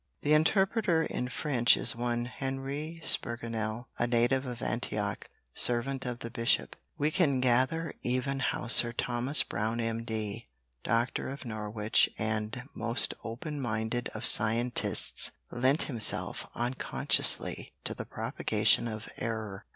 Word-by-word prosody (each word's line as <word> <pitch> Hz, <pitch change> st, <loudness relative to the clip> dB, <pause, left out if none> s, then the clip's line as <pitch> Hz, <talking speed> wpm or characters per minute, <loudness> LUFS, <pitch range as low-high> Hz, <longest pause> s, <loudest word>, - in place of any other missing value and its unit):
The 150 Hz, -, +3 dB
interpreter 190 Hz, +2 st, +2 dB
in 125 Hz, -, -3 dB
French 125 Hz, -1 st, +2 dB
is -, -, +1 dB
one 120 Hz, 0 st, -2 dB
Henri 135 Hz, +5 st, -5 dB
Spigurnel 115 Hz, 0 st, -3 dB
a 120 Hz, -, +1 dB
native 120 Hz, +3 st, +1 dB
of 125 Hz, -2 st, -6 dB
Antioch, -, -, -3 dB, 0.2 s
servant 130 Hz, +2 st, 0 dB
of 120 Hz, -1 st, -3 dB
the 115 Hz, -, -6 dB
bishop. 115 Hz, +2 st, 0 dB, 0.2 s
We 150 Hz, +2 st, +1 dB
can 150 Hz, -7 st, +2 dB
gather 130 Hz, +6 st, +1 dB
even 130 Hz, +2 st, -1 dB
how 135 Hz, -, -2 dB
Sir 120 Hz, 0 st, +6 dB
Thomas 125 Hz, +4 st, +3 dB
Brown 110 Hz, +4 st, -3 dB
M. 115 Hz, 0 st, -2 dB
D., 110 Hz, -1 st, -5 dB, 0.4 s
doctor 115 Hz, +4 st, 0 dB
of 140 Hz, 0 st, -8 dB
Norwich 110 Hz, -1 st, +1 dB
and 110 Hz, +2 st, -3 dB
most 115 Hz, +2 st, +1 dB
open 140 Hz, +6 st, -5 dB
minded 115 Hz, 0 st, -2 dB
of 110 Hz, -, -4 dB
scientists, 115 Hz, +3 st, +4 dB, 0.2 s
lent 130 Hz, +5 st, +2 dB
himself, 115 Hz, -7 st, +1 dB
unconsciously, 120 Hz, +2 st, 0 dB
to -, -, -2 dB
the -, -, -7 dB
propagation 120 Hz, -, +1 dB
of 110 Hz, -1 st, -6 dB
error. 110 Hz, -4 st, -5 dB
120 Hz, 130 wpm, -30 LUFS, 115-135 Hz, 0.4 s, Sir